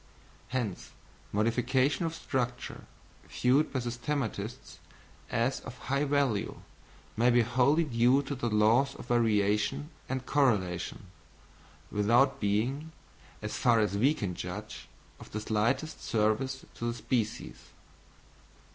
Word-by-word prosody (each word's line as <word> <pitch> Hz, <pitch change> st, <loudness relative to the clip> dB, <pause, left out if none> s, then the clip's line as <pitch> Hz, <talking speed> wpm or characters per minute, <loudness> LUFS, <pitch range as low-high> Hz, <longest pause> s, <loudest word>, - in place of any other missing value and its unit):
Hence 120 Hz, -7 st, -3 dB, 0.4 s
modifications 130 Hz, -, +1 dB
of 165 Hz, -, -5 dB
structure, 125 Hz, -5 st, -3 dB, 0.4 s
viewed 130 Hz, +5 st, +2 dB
by 130 Hz, -, -1 dB
systematists 120 Hz, -1 st, -4 dB, 0.5 s
as 120 Hz, +4 st, 0 dB
of 125 Hz, -1 st, -10 dB
high 140 Hz, +3 st, -1 dB
value, 140 Hz, -7 st, 0 dB, 0.5 s
may 120 Hz, +3 st, +4 dB
be 120 Hz, -1 st, +5 dB
wholly 130 Hz, +7 st, +3 dB
due 125 Hz, 0 st, +3 dB
to 140 Hz, -, -4 dB
the 120 Hz, -3 st, -2 dB
laws 115 Hz, +6 st, +3 dB
of -, -, -9 dB
variation 115 Hz, +5 st, +1 dB, 0.2 s
and 130 Hz, -1 st, -3 dB
correlation, 100 Hz, -12 st, +1 dB, 0.9 s
without 120 Hz, +7 st, +3 dB
being, 120 Hz, +10 st, 0 dB, 0.5 s
as -, -, -3 dB
far 120 Hz, -2 st, +4 dB
as 105 Hz, -2 st, +1 dB
we 135 Hz, +9 st, +3 dB
can 100 Hz, -8 st, -3 dB
judge, -, -, -7 dB, 0.3 s
of -, -, -13 dB
the 110 Hz, -, -2 dB
slightest 115 Hz, +8 st, -1 dB
service 120 Hz, +5 st, 0 dB
to 115 Hz, -, -5 dB
the 120 Hz, -, -2 dB
species. 115 Hz, -3 st, -2 dB
120 Hz, 120 wpm, -30 LUFS, 110-135 Hz, 0.9 s, be